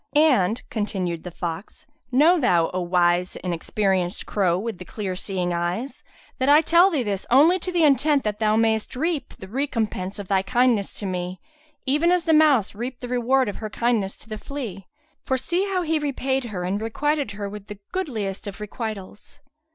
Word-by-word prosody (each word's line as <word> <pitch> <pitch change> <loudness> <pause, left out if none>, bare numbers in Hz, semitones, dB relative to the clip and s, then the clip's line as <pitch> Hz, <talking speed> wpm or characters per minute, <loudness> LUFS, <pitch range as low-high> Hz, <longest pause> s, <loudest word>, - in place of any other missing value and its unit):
And 250 - +3
(continued 185 -6 -2
the 180 - -6
fox) 170 +2 -6 0.3
know 315 +8 +5
thou, 175 - +2
O 185 - -1
wise 175 0 +2
and 180 -1 -3
experienced 185 +1 -1
crow 180 -4 +1
with 215 0 -4
the - - -6
clear 190 0 -4
seeing 180 -2 -2
eyes, 175 +10 -3 0.4
that 260 +2 +2
I 295 +2 +7
tell 340 +4 +5
thee 300 -9 0
this 200 -3 -3
only 310 +9 +5
to 365 - -4
the 345 -2 +2
intent 290 0 +4
that 210 -1 -2
thou 215 -1 +2
mayst 220 +1 +1
reap 310 0 -2
the 190 - -10
recompense 220 -6 -2
of 200 -2 -6
thy 195 -1 +2
kindness 235 0 +1
to 205 - -4
me, 180 -1 -3 0.5
even 300 +6 +2
as 360 -2 +2
the 325 - +3
mouse 295 -9 +4
reaped 240 +4 -6
the 245 - -6
reward 250 +1 +2
of 205 - -4
her 215 - -5
kindness 220 -4 0
to - - -12
the 215 -1 -6
flea; 215 -9 -6 0.4
for 260 - 0
see 345 +9 0
how 380 -2 -1
he 320 -1 +1
repaid 270 -2 -1
her 195 -6 -4
and 195 +4 -2
requited 285 +2 -1
her 205 0 -5
with 205 0 -9
the 205 - -8
goodliest 220 - -3
of 200 +1 -7
requitals. 210 +3 -7
220 Hz, 190 wpm, -24 LUFS, 190-275 Hz, 0.5 s, I